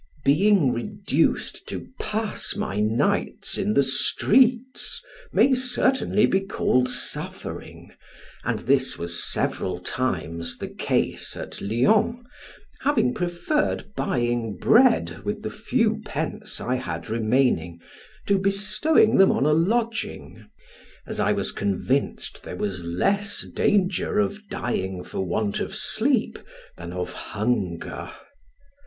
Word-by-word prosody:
Being 160 0 +4
reduced 200 - -1
to - - -6
pass 215 -1 -2
my 105 - -2
nights 110 +3 +1
in 105 - 0
the 140 - +5
streets, 245 - +2 0.3
may 270 - +4
certainly 255 -3 +2
be 190 - +2
called 130 -9 +1
suffering, - - -4 0.5
and - - -1
this 135 -1 +2
was 85 0 -1
several 90 -1 -1
times 85 -7 -2
the - - -6
case - - -1
at - - -8
Lyons, 210 - +2 0.6
having 280 -3 +2
preferred 195 - -1
buying 120 -3 -1
bread 245 +1 +4
with 210 +1 -3
the - - -3
few 220 0 0
pence 210 +6 -3
I 125 +1 -1
had 85 -9 -5
remaining, 110 -7 +1 0.5
to 200 -1 +2
bestowing 205 +8 +3
them 195 - +6
on 135 - +1
a 150 - +4
lodging; 225 +8 -1 0.6
as - - -6
I - - +2
was - - -1
convinced 100 +8 -1
there - - -7
was 95 -4 -3
less 200 - 0
danger 195 -1 +1
of 205 0 -1
dying 95 -6 -3
for - - -7
want 100 +3 -1
of - - -4
sleep - - +2 0.4
than 85 0 -8
of 90 0 -4
hunger. 100 -6 -3
160 Hz, 120 wpm, -24 LUFS, -, 0.6 s, them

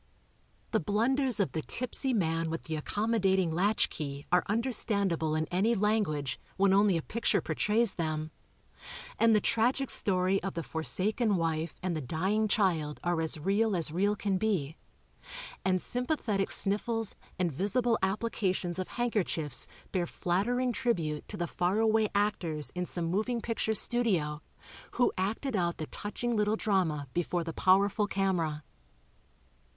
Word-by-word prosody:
The 220 - +2
blunders 240 - +1
of 200 - +1
the 160 - -2
tipsy 255 - -2
man 165 -7 0
with 165 0 -4
the 160 - -4
accommodating 190 0 +1
latch 200 +6 +1
key 140 -1 -5
are 180 0 +4
understandable 200 -8 0
in 155 0 0
any 205 +6 +2
language, 190 - 0 0.2
when 195 0 +4
only 200 -2 +4
a 160 - -3
picture 230 +1 0
portrays 215 0 +1
them, 155 -2 -3 0.9
and 230 -1 +5
the - - +5
tragic 240 +5 +1
story 185 0 +2
of 195 0 -4
the 165 - -2
forsaken 205 +8 +1
wife 165 -2 -1
and 180 -2 -1
the 155 - -2
dying 190 - 0
child 170 -8 +1
are 175 -2 +1
as 160 -1 -1
real 200 +5 +1
as 165 -3 0
real 200 +5 +1
can 200 -2 -1
be, 180 -9 0 0.9
and 185 -1 +2
sympathetic 240 - -1
snif 200 +1 +2
fles 225 -2 -3 0.2
and 180 -2 0
visible 225 - +1
applications 190 -3 -1
of 185 - -2
handkerchiefs 190 - -1 0.2
bear 180 -3 0
flattering 240 +11 0
tribue 170 - -1
to - - -7
the 175 - -1
far 180 +3 0
away 220 -1 +3
actors 175 -7 0
in 180 0 -3
some 175 -2 -2
moving 215 +8 0
picture 225 -1 -1
studio, 185 -12 +1 0.5
who 245 - +2
acted 220 +7 -2
out 175 -3 0
the 155 - -4
touching 235 +7 -3
little 210 0 +2
drama 175 -10 0
before 175 0 -1
the 165 0 -5
powerful 200 +4 +3
camera. 175 -7 0
195 Hz, 150 wpm, -30 LUFS, 165-220 Hz, 0.9 s, and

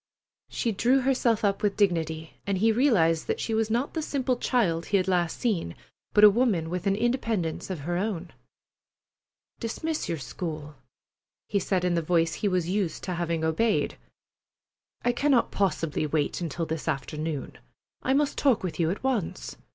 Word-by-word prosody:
She 235 - -1
drew 245 +6 +3
herself 245 -4 +2
up 200 -1 +1
with 205 -1 0
dignity, 160 -5 0
and 200 -1 +1
he 225 +4 +4
realized 205 - +3
that - - -1
she 225 - -2
was 220 0 +1
not 240 +5 0
the 320 - -1
simple 265 -4 0
child 185 -10 0
he 200 - +3
had 185 - +1 0.2
seen 215 - -1
last, - - -26 0.4
but 210 - +6
a 210 - +12
woman 200 -8 +1
with 180 +1 -2
an 195 - +3
independence 225 -8 -1
of 180 -6 -4
her 175 +4 -2
own. 185 -3 -3 1.3
"Dismiss 310 +7 -3
your 165 - -1
school," 155 0 -6 0.8
he 200 - +2
said 185 -1 0
in 180 - +2
the 170 - +1
voice 165 0 +2
he 205 - -1
was 180 -3 0
used 185 -3 -1
to 180 - -3
having 170 -2 -1
obeyed. 185 +8 +1 1.1
"I 245 - +4
cannot 260 0 +2
possibly 165 -5 0
wait 150 +2 -1
until 165 0 -2
this 160 0 -4
afternoon. 150 0 -3 0.4
I 265 - +1
must 290 0 +1
talk 260 -9 +3
with 180 -2 -4
you 165 -1 +2
at 195 - -3
once. 210 - -2
190 Hz, 175 wpm, -27 LUFS, 165-230 Hz, 1.3 s, a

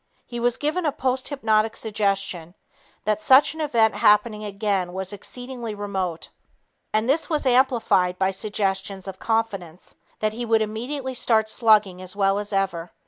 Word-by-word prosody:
He 240 - -6
was 240 0 +1
given 310 +5 -1
a - - +2
posthypnotic 250 -5 0
suggestion 195 -5 -2 0.5
that 215 0 0
such 265 +6 +6
an 320 - -6
event 230 -7 +2
happening 210 +1 +3
again 200 -3 -2
was 190 +1 -4
exceedingly 245 +1 -5
remote, 190 -5 -4 0.6
and 215 +2 +1
this 295 +5 +1
was 305 -3 -1
amplified 245 -8 +3
by 190 0 +1
suggestions 195 -1 -3
of 190 -1 -7
confidence 195 -7 -3 0.2
that 215 0 -1
he 240 +2 -4
would 225 -1 +2
immediately 255 +5 -4
start 220 -3 +1
slugging 215 -5 +3
as 185 +1 -2
well 195 0 +2
as 205 0 -5
ever. 190 -4 -1
215 Hz, 150 wpm, -23 LUFS, 195-240 Hz, 0.6 s, such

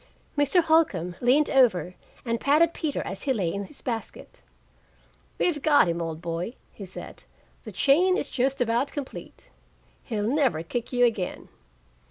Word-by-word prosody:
Mr. 290 +5 +3
Holcombe 285 - +2
leaned 265 +5 +4
over 185 - +3 0.3
and 230 -1 -1
patted 315 +4 +3
Peter 305 -4 -3
as 195 - -6
he 270 - 0
lay 185 -8 -1
in 200 0 -4
his 280 - -16
basket. 230 -4 -6 1.0
"We've 310 -5 0
got 290 - +5
him, 170 0 -1
old 165 -1 -5
boy," 170 +8 -4 0.2
he 200 - -9
said. 185 - -9 0.4
"The - - -7
chain 360 +7 +3
is - - -2
just 265 +1 -1
about 240 +4 +1
complete. 285 -3 -8 0.5
He'll 210 -4 -2
never 255 - +1
kick 235 +7 -4
you 245 -1 +4
again." 215 -6 -2
245 Hz, 155 wpm, -26 LUFS, 190-290 Hz, 1.0 s, got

